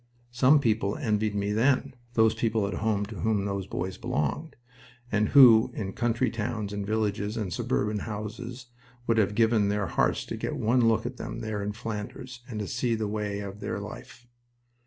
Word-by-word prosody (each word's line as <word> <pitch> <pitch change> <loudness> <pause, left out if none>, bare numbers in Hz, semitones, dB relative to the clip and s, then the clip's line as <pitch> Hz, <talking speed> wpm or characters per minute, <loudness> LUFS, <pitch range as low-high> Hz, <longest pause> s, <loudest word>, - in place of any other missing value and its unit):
Some 130 +5 +5
people 110 -6 +1
envied 105 -1 0
me 100 0 -1
then 130 +5 +2 0.2
those 110 -1 +5
people 110 -2 0
at 100 - -4
home 105 -1 0
to 105 -2 -8
whom 105 +2 +1
those 100 -2 -3
boys 95 0 -4
belonged, 75 - -2 0.6
and 105 0 +2
who 120 -5 +8
in 95 -3 -4
country 120 +1 0
towns 105 -2 -3
and 100 -1 -4
villages 105 -1 -1
and 100 -6 -3
suburban 105 +5 -1
houses 115 +4 -6 0.4
would 115 -1 +2
have 105 -1 +1
given 110 -2 +3
their 105 -1 0
hearts 85 - 0
to - - -5
get - - -3
one 120 +2 +2
look 115 0 +2
at 125 +1 -5
them - - -6
there 110 -2 -3
in 105 +1 -3
Flanders 115 +3 -6
and 110 -3 -4
to 105 - -3
see 120 -2 0
the 110 -1 -2
way 105 -1 -3
of 100 0 -7
their 100 0 -3
life... 110 +3 -10
110 Hz, 185 wpm, -27 LUFS, 100-115 Hz, 0.6 s, who